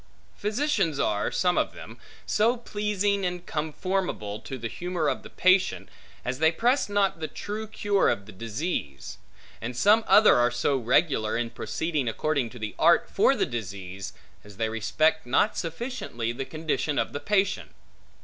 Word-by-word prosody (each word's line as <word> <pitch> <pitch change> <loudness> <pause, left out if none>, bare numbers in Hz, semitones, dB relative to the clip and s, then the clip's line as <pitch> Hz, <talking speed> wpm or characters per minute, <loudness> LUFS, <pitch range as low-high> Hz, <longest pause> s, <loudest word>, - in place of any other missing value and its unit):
Physicians 210 - 0
are, 105 0 0
some 180 -1 +2
of - - -1
them, - - -11 0.3
so 230 +4 +2
pleasing 205 -3 -1
and 180 -1 -3
conformable 155 - -2
to 135 +4 -7
the 115 -2 -4
humor 175 +3 -2
of - - 0
the - - -11
patient, 185 +1 +2 0.4
as 125 +2 -2
they 160 +1 +5
press 240 - +1
not 200 -4 +1
the 155 - -3
true 215 +5 -5
cure 205 -2 +1
of 100 - -1
the 110 - -11
disease; 110 - -4 0.4
and 120 +2 -5
some 215 - +5
other 215 - +7
are 120 0 +4
so 120 +3 0
regular, 125 -2 +2
in 120 -1 -2
proceeding 135 +6 -2
according 135 +2 0
to 110 -3 -6
art - - +4
for - - +4
the - - +1
disease, 100 -4 -6 0.3
as 105 -1 -14
they 110 0 0
respect 155 +8 +1
not 140 - +2
sufficiently 165 - -4
the 135 +3 -5
condition 155 -1 -2
of - - 0
the 145 - -3
patient. 195 +4 0
155 Hz, 160 wpm, -26 LUFS, 115-195 Hz, 0.4 s, other